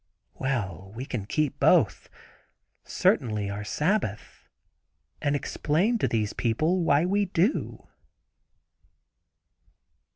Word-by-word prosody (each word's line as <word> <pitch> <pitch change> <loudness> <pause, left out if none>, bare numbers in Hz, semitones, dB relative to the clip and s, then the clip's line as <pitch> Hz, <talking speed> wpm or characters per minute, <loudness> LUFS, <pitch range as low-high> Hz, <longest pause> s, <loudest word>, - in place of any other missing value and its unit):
Well, 95 - -3
we 125 +3 -5
can 110 -7 -5
keep 145 +2 -1
both—certainly 105 - 0
our 105 +1 -5
Sabbath, 150 - -2 0.7
and 145 0 +1
explain 175 - 0
to - - +1
these 110 -2 -1
people 155 +10 0
why 145 +1 +3
we 200 +2 +1
do. 185 - -1
140 Hz, 90 wpm, -27 LUFS, 105-175 Hz, 0.7 s, why